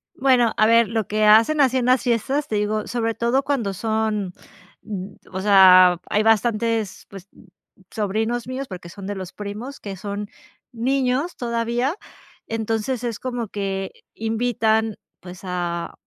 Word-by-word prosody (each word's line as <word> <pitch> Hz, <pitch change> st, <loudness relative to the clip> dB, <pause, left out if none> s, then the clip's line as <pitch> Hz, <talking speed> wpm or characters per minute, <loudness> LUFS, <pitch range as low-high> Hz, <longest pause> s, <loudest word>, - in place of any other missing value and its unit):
Bueno, 250 Hz, -4 st, +3 dB
a 215 Hz, -, +5 dB
ver 230 Hz, 0 st, +5 dB
lo 220 Hz, -3 st, -1 dB
que 215 Hz, 0 st, +1 dB
hacen 230 Hz, +8 st, +5 dB
así 260 Hz, -1 st, +3 dB
en 245 Hz, -, 0 dB
las 255 Hz, 0 st, +4 dB
fiestas, 260 Hz, +4 st, 0 dB
te 215 Hz, -, -2 dB
digo 210 Hz, +1 st, -1 dB
sobre 230 Hz, -2 st, -1 dB
todo 240 Hz, +5 st, +1 dB
cuando 240 Hz, -9 st, -1 dB
son, 215 Hz, -2 st, -1 dB, 1.0 s
o 190 Hz, 0 st, -4 dB
sea, 185 Hz, -3 st, +7 dB
hay 210 Hz, +1 st, +2 dB
bastantes, 225 Hz, -1 st, +1 dB
pues, 195 Hz, 0 st, -12 dB, 0.6 s
sobrinos 220 Hz, +3 st, -2 dB
míos, 260 Hz, +1 st, -4 dB
porque 180 Hz, -2 st, -9 dB
son 195 Hz, +2 st, -10 dB
de 205 Hz, -, -3 dB
los 185 Hz, -2 st, -7 dB
primos, 210 Hz, +7 st, -7 dB
que 200 Hz, -2 st, -7 dB
son 205 Hz, +2 st, -5 dB, 0.4 s
niños 260 Hz, +6 st, 0 dB
todavía, 235 Hz, +5 st, -1 dB, 0.5 s
entonces 225 Hz, +2 st, -2 dB
es 235 Hz, -3 st, -3 dB
como 245 Hz, -3 st, -4 dB
que 195 Hz, -1 st, -3 dB, 0.2 s
invitan, 220 Hz, -1 st, 0 dB, 0.2 s
pues, 180 Hz, 0 st, -11 dB
a, 175 Hz, -2 st, -3 dB
220 Hz, 145 wpm, -22 LUFS, 200-240 Hz, 1.0 s, sea